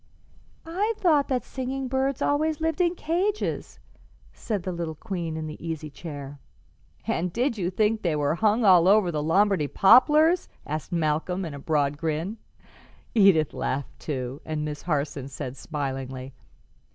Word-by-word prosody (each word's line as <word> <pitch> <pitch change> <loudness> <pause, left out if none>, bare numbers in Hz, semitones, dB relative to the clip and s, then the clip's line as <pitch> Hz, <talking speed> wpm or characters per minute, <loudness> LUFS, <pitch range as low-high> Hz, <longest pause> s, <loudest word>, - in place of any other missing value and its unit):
"I 400 +7 -1
thought 305 -6 +3
that 255 -2 0
singing 265 0 -4
birds 265 +1 0
always 305 +1 +1
lived 320 +1 0
in 350 0 +2
cages," 370 +6 -2 0.5
said 205 -6 -3
the 185 - -3
little 170 -2 -4
queen 170 -4 -4
in 160 - -4
the 155 +1 -8
easy 160 -2 -5
chair. 145 -3 -8 0.7
"And 175 +2 -1
did 240 +5 0
you 180 -5 -1
think 215 +3 +1
they 170 -4 0
were 145 0 +1
hung 215 +5 +2
all 180 -3 +7
over 200 -2 +5
the 150 -2 -2
Lombardy 185 0 +2
poplars?" 305 - +5 0.2
asked 155 +3 -4
Malcolm, 170 +3 0
in 160 - -6
a 140 - -7
broad 145 -1 0
grin. 165 +7 -2 0.8
Edith 195 -9 +4
laughed 135 0 -3
too, 130 -2 -4
and 155 -1 -3
Miss 150 -1 -5
Harson 145 -4 -2
said 130 -1 -6
smilingly. 135 -3 -5
175 Hz, 150 wpm, -26 LUFS, 150-245 Hz, 0.8 s, all